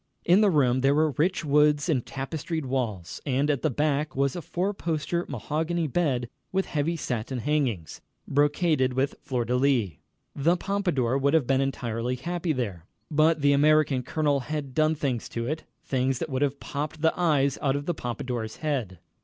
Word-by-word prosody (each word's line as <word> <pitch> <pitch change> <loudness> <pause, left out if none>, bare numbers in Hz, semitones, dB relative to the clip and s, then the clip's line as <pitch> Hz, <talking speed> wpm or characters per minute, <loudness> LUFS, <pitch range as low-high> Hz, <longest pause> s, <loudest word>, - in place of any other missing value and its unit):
In 180 +5 +5
the 210 - +5
room 130 -6 +3
there 135 +2 +3
were 155 0 +3
rich 165 +5 0
woods 150 +1 +3
and 140 -8 +1
tapestried 155 +3 -4
walls, 115 -10 -3
and 140 +1 +1
at 140 - -1
the 155 - +2
back 150 +2 0
was 140 0 +1
a 175 - -4
four 185 +6 -2
poster 170 -1 -2
mahogany 160 +6 -1
bed 135 -5 0 0.2
with 190 0 +1
heavy 155 +3 -1
satin 125 -2 -3
hangings, 120 - -1 0.3
brocaded 145 -2 +2
with 135 +2 0
fleur 125 -3 -2
de 125 - 0
lis. 125 -6 +2 0.5
The 165 +6 +2
Pompadour 170 -11 0
would 140 +3 +2
have 155 -5 +3
been 135 +1 +2
entirely 125 -2 -2
happy 170 +5 -2
there. 100 - -3 0.2
But 155 +1 +3
the 140 0 +4
American 150 -2 +4
colonel 145 +2 0
had 145 0 -4
done 155 +2 +2
things 135 -6 -2
to 115 0 -3
it 155 +5 -3 0.2
things 130 0 0
that 160 +3 -4
would 130 +1 -1
have 140 -1 0
popped 150 +2 -5
the 160 - +4
eyes 145 -6 +2
out 135 -1 +1
of 145 0 -3
the 175 - 0
Pompadour's 120 -4 -4
head. 130 - -2
145 Hz, 180 wpm, -26 LUFS, 130-155 Hz, 0.5 s, In